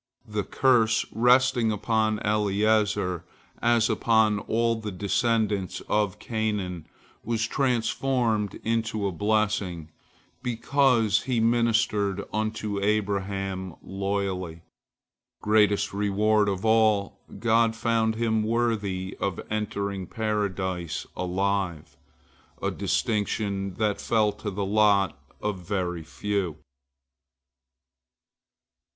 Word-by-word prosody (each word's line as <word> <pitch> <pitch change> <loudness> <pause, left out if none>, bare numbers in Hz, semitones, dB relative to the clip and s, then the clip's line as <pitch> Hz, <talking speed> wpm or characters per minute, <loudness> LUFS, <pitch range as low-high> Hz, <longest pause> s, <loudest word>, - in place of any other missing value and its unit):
The 105 -1 -2
curse 115 0 +3
resting 125 0 +3
upon 110 0 +1
Eliezer, 105 -3 +1 0.4
as 120 -1 +3
upon 110 -2 +2
all 115 +2 0
the 110 -2 -5
descendants 105 0 0
of 105 -3 0
Canaan, 105 -7 -3 0.4
was 115 0 0
transformed 120 -3 0
into 110 -2 -1
a 100 - 0
blessing, 100 -4 -1 0.5
because 120 -2 +2
he 125 -3 0
ministered 115 -4 +1
unto 110 -1 -2
Abraham 95 -3 -1
loyally. 95 -4 -3 0.8
Greatest 105 -2 +2
reward 105 +1 +2
of 95 +1 -3
all, 110 -3 +3 0.2
God 115 +1 +2
found 115 -1 +1
him 110 -1 +1
worthy 105 -5 -1
of 100 -3 -2
entering 100 -3 -2
Paradise 95 -6 -2
alive, 95 -2 -2 0.6
a - - -1
distinction 100 -3 -1
that 105 -1 0
fell 110 -2 +2
to 105 - -6
the 100 0 -3
lot 100 -3 +3 0.3
of 105 -3 -2
very 90 -2 -2
few. 90 +1 -3
105 Hz, 95 wpm, -26 LUFS, 100-110 Hz, 0.8 s, curse